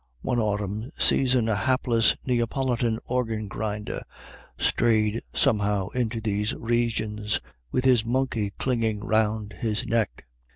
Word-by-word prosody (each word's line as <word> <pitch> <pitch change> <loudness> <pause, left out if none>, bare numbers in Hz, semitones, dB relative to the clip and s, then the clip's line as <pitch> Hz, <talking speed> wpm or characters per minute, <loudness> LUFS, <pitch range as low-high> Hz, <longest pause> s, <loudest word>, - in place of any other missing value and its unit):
One 125 -2 0
autumn 105 +1 -2
season 125 -3 +4
a 110 - +2
hapless 120 -1 +2
Neapolitan 120 -1 0
organ 115 -4 -1
grinder 105 +1 -4 0.6
strayed 110 -1 +2
somehow 105 -2 +1
into 120 -2 -1
these 105 0 -1
regions, 110 -3 0 0.3
with 130 - 0
his 125 -4 +5
monkey 115 -3 0
clinging 115 -5 0
round 110 -1 +1
his 110 -2 -1
neck. 110 - -1
110 Hz, 115 wpm, -26 LUFS, 105-120 Hz, 0.6 s, his